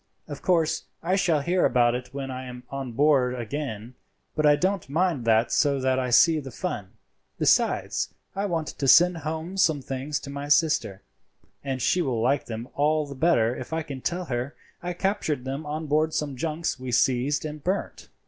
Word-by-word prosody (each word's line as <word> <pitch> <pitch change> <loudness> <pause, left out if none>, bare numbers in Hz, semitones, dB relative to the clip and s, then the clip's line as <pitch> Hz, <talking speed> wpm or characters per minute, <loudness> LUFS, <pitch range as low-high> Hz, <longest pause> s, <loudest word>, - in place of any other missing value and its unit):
Of 145 -2 -7
course 165 -4 +1 0.2
I 180 +3 +1
shall 170 -6 +2
hear 175 +5 +1
about 120 -2 +3
it 125 0 -5
when 135 -1 -5
I 130 0 -6
am 125 0 -9
on 135 -3 -5
board 130 -2 +3
again; 120 -2 -5 0.4
but 155 -1 +3
I 145 - +6
don't 185 -1 -1
mind 160 -4 0
that 115 +1 +3
so 140 -2 +2
that 130 0 +1
I 125 -1 -1
see 155 +6 +5
the 135 -2 -7
fun. 120 - -5 0.4
Besides, - - +1 0.2
I 200 +1 -1
want 165 -4 -2
to 135 - -3
send 175 +6 +6
home 160 +4 -5
some 160 -6 +3
things 135 +2 -3
to 140 - -8
my 140 +1 -5
sister, 145 - +2 0.6
and 135 -3 -3
she 180 - +2
will 130 -8 -1
like 135 +5 +1
them 115 +1 -5
all 150 +1 +1
the 140 - -8
better 130 -6 +2
if - - -7
I 160 0 -1
can 135 -3 -7
tell 180 +5 -2
her 125 0 -3 0.3
I 175 0 -3
captured 175 -8 -1
them 135 +3 -4
on 155 +2 -3
board 155 +2 +1
some 145 -3 -2
junks 160 +4 -2
we 130 -1 -5
seized 130 +5 +2
and 150 -1 -6
burnt." 190 +3 -3
145 Hz, 195 wpm, -26 LUFS, 130-160 Hz, 0.6 s, I